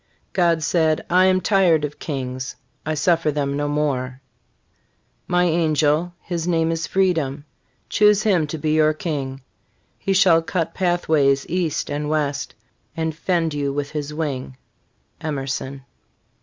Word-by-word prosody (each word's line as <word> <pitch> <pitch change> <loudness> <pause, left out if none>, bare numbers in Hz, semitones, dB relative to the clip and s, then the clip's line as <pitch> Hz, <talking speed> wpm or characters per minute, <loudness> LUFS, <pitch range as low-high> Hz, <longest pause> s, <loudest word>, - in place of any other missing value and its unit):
God 170 -3 +2
said, 160 -1 +1
I 185 +1 +5
am 185 0 +3
tired 180 -6 +3
of 150 - -8
kings, 130 -3 -4 0.3
I 155 - 0
suffer 165 +1 +2
them 140 -1 -1
no 145 0 -1
more; 135 -4 -1 1.1
My 180 0 +2
angel, 160 0 +1
his 170 -1 -3
name 165 -2 +2
is 165 0 -2
Freedom, 160 -7 0 0.4
Choose 210 -1 +4
him 180 -8 +2
to 160 - -4
be 155 +1 -1
your 155 0 +4
King; 140 -5 -4 0.6
He 195 - 0
shall 180 -4 +5
cut 165 -1 -2
pathways 155 -7 +2
east 175 -3 -1
and 150 +1 -2
wt 150 -2 +1
st, 140 - -6 0.4
And 160 -1 -1
fend 165 -1 0
you 140 -1 -1
with 145 0 -3
his 150 -1 -4
wing. 140 -4 -4 0.6
Emerson. 135 -2 -4
155 Hz, 140 wpm, -22 LUFS, 145-175 Hz, 1.1 s, I